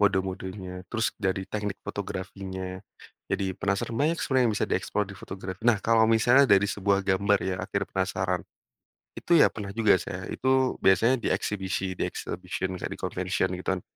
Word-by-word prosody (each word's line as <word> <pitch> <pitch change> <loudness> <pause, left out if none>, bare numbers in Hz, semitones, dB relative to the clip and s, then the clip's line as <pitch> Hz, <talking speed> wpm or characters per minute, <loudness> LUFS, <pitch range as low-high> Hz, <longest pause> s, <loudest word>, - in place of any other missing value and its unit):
mode-modenya, 95 -1 -1
terus 110 0 0
dari 95 -1 0
teknik 105 0 -3
fotografinya. 95 -2 -5 0.5
Jadi 95 -1 -1
penasaran 100 +3 -1
banyak 155 +7 +2
sebenarnya 130 -2 +2
yang 105 - 0
bisa - - 0
di-explore 105 -1 0
di 100 - -9
fotografi 95 +2 -7
nah 115 -4 +5
kalau 115 -1 +4
misalnya 115 +5 +5
dari 100 0 +6
sebuah 100 -1 +1
gambar 100 +1 +3
ya, 95 -1 -1
akhir 100 +1 -2
penasaran. 95 -1 0 0.8
Itu 170 - 0
ya - - +7
pernah 105 -2 -6
juga 110 -4 +4
saya. 90 +1 -6
Itu 130 0 +1
biasanya 115 +7 +4
di 120 - -2
eksibisi, 95 -2 -2
di - - 0
exhibition 95 -1 -4
kan, - - -5
di - - -6
convention 95 0 -1
gitu 90 - -9
kan. - - -8
100 Hz, 170 wpm, -27 LUFS, 95-110 Hz, 0.8 s, ya